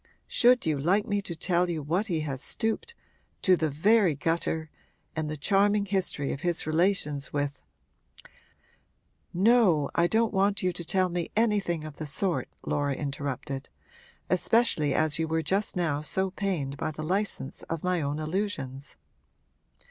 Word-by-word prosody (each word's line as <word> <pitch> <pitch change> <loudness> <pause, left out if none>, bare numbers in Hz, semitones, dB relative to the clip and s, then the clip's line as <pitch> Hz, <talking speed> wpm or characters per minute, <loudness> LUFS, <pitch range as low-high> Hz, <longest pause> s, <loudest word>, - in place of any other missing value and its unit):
'Should 250 +1 +4
you 155 -3 +1
like 190 +8 +2
me 205 -3 0
to 175 -4 -5
tell 175 +2 +1
you 170 - -1
to 155 - -5
what 175 +9 0
he 165 -5 -1
has 140 -3 -4
stooped 225 - -2 0.5
to 185 - +6
the 160 -3 0
very 185 +3 +3
gutter 160 +1 -1 0.4
and 155 -1 -2
the 155 - -4
charming 200 +6 +2
history 190 -8 -1
of 140 - -7
his 175 -1 0
relations 155 -3 0
with 145 0 -2 0.8
' - - -39
'No, 190 - +4
I 170 0 +3
don't 220 +2 +1
want 200 0 +2
you 180 -1 +1
to 170 - -5
tell 185 +2 +2
me 175 -1 -2
anything 205 -7 +1
of 155 -2 -8
the 155 - -5
sort,' 175 +5 0 0.2
Laura 145 -1 0
interrupted. 140 -1 -4 0.6
'Especially 225 - +2
as 155 -1 +2
you 160 - 0
were 160 0 0
just 195 +6 0
now 160 -5 0
so 190 +5 -1
pained 175 -9 -2
by 140 - -2
the 155 0 -6
license 180 -4 -2
of 165 -1 -3
my 180 -2 +1
own 145 +1 -2
allusions.' 155 -6 -3
170 Hz, 165 wpm, -28 LUFS, 150-195 Hz, 0.8 s, to